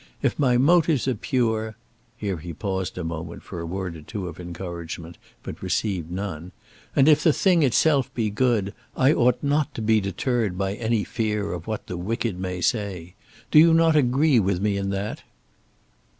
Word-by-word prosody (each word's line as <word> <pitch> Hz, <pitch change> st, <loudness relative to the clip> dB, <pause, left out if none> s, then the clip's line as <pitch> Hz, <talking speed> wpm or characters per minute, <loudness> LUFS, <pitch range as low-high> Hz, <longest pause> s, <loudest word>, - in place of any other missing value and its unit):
If -, -, 0 dB
my 125 Hz, -4 st, +3 dB
motives 155 Hz, 0 st, +3 dB
are 130 Hz, -, +2 dB
pure," 110 Hz, -3 st, -1 dB, 0.4 s
here 100 Hz, -5 st, -3 dB
he 85 Hz, +2 st, -7 dB
paused 95 Hz, +1 st, -3 dB
a 90 Hz, -, -3 dB
moment 80 Hz, 0 st, -6 dB
for 90 Hz, -, -7 dB
a 85 Hz, -, -5 dB
word 90 Hz, -1 st, -4 dB
or 80 Hz, -, -10 dB
two 95 Hz, +3 st, -6 dB
of 85 Hz, 0 st, -9 dB
encouragement, 85 Hz, -1 st, -7 dB, 0.2 s
but -, -, -8 dB
received 95 Hz, -7 st, -1 dB
none, 90 Hz, -2 st, -5 dB, 0.4 s
"and 140 Hz, 0 st, +5 dB
if 150 Hz, -1 st, +6 dB
the 160 Hz, -, +5 dB
thing 180 Hz, +2 st, +3 dB
itself 140 Hz, 0 st, +3 dB
be 110 Hz, -3 st, 0 dB
good, 110 Hz, -3 st, +1 dB, 0.2 s
I 135 Hz, +3 st, +5 dB
ought 125 Hz, -1 st, +2 dB
not 145 Hz, 0 st, 0 dB
to -, -, -4 dB
be 110 Hz, 0 st, +3 dB
deterred 100 Hz, +1 st, -1 dB
by 95 Hz, 0 st, -1 dB
any 110 Hz, 0 st, 0 dB
fear 105 Hz, -3 st, -2 dB
of 85 Hz, -1 st, -7 dB
what 110 Hz, -2 st, -4 dB
the 90 Hz, -, -5 dB
wicked 110 Hz, +1 st, -2 dB
may 90 Hz, -1 st, -4 dB
say. 95 Hz, -7 st, -2 dB, 0.4 s
Do 150 Hz, -, +7 dB
you 165 Hz, +1 st, +7 dB
not 165 Hz, -1 st, +4 dB
agree 135 Hz, 0 st, +4 dB
with 95 Hz, -3 st, 0 dB
me 100 Hz, 0 st, 0 dB
in 100 Hz, 0 st, -2 dB
that?" 100 Hz, +2 st, -3 dB
105 Hz, 185 wpm, -24 LUFS, 90-125 Hz, 0.4 s, Do